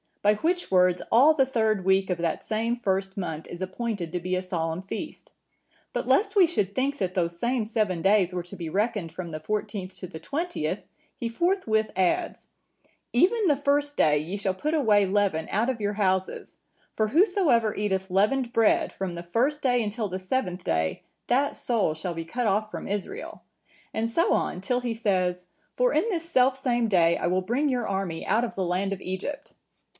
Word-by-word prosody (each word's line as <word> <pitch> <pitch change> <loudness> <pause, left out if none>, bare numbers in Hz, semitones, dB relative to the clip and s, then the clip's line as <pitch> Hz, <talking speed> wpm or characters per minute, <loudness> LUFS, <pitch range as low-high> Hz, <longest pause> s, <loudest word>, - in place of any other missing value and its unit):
By 210 +1 +5
which 350 - -1
words 180 -1 +4
all 280 +7 +7
the 270 -3 +4
third 220 -6 +1
week 190 0 +3
of 180 -2 -1
that 170 -1 -1
same 225 +2 -1
first 195 -4 -2
month 160 -4 -4
is 175 - -8
appointed 190 -2 -3
to 180 - -2
be 185 +1 -2
a 185 - 0
solemn 165 -2 -3
feast. 190 - -7 0.6
But - - -2
lest 405 -1 +2
we 385 -3 +7
should 205 - -1
think 275 +4 0
that 185 -5 -2
those 170 -2 -1
same 240 0 0
seven 210 -6 -1
days 195 -2 +3
were 180 -1 -2
to 180 +3 -10
be 170 -3 -5
reckoned 205 -2 -1
from 170 +1 -6
the 155 -1 -5
fourteenth 200 +1 -4
to 185 - -7
the 160 -2 -9
twentieth, 330 - -3 0.3
He 235 - -3
forthwith 230 - +1
adds,(956) 185 -1 0 0.7
'Even 400 - +3
the 295 - +4
first 285 +1 +1
day 150 -1 +4
ye 165 +7 -3
shall 195 -2 -1
put 300 +11 -2
away 215 -10 +4
leaven 190 -5 +1
out 220 +5 +1
of 240 -4 -2
your 205 0 0
houses; 190 -2 -1 0.4
for 215 -1 +1
whosoever 315 - +3
eateth 190 -2 -1
leavened 235 +6 +2
bread, 225 -3 +3
from 190 -2 -4
the 170 0 -6
first 255 +12 0
day 245 -3 +3
until 215 +1 -2
the 185 0 -4
seventh 185 -3 -2
day, 80 - -1 0.2
that 275 +4 +2
soul 225 -10 0
shall 170 +3 -4
be 165 0 -4
cut 240 +7 -2
off 210 +2 +1
from - - -6
Israel;' 205 - -5 0.5
and 225 +1 -1
so 330 +9 +2
on, 180 - -1
till 245 +6 0
he 240 -2 -2
says,(957) 185 -5 0 0.3
'For - - +2
in 460 - +2
this 335 -5 -2
selfsame 255 -4 +2
day 170 -5 +3
I - - -1
will 185 +2 +1
bring 250 +10 0
your 245 -3 -1
army 190 -4 -3
out 220 +4 +2
of 240 - -4
the 190 - -1
land 185 +3 0
of 195 - -7
Egypt. 275 +11 -5
205 Hz, 195 wpm, -26 LUFS, 185-250 Hz, 0.7 s, all